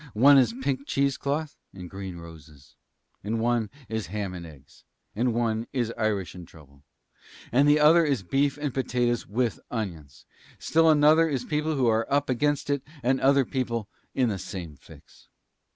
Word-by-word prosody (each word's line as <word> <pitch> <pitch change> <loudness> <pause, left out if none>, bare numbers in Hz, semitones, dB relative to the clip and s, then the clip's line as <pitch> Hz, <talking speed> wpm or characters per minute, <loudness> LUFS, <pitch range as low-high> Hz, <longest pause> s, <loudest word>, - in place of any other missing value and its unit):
One 135 +5 +7
is 120 -3 +2
pink 135 0 -2
cheese 140 -1 +1
cloth 145 +2 -3 0.2
and 90 -2 -8
green 95 -1 -7
roses, 80 -4 -14 0.5
and 110 +3 -2
one 115 -2 0 0.2
is 110 -1 -4
ham 100 -1 -4
and 85 -2 -8
eggs, 70 -3 -17 0.3
and 120 +3 +1
one 115 -1 -1
is 120 -3 -1
Irish 110 -5 -1
and 90 -2 -11
trouble. 70 -4 -18 0.7
And 140 +4 +4
the 150 +1 +5
other 155 +3 +6
one 155 -3 +1
is 130 -8 -1
beef 140 +8 0
and 145 -3 -3
potatoes 125 -2 -1
with 120 +2 -1
onions. 85 - -6 0.3
And - - -20
still 165 0 +4
another 155 +2 +5
one 155 -4 -1
is 125 -1 -4
people 150 +1 -1
who 130 -3 +1
are 115 -1 +1
up 140 -1 +1
against 145 +3 0
it 140 -1 0 0.2
and 130 +2 +1
other 135 0 +4
people 120 -5 -3 0.3
in 125 -3 +2
the 100 -3 -3
same 90 -7 -7
fix." 65 - -18
120 Hz, 185 wpm, -26 LUFS, 100-140 Hz, 0.7 s, One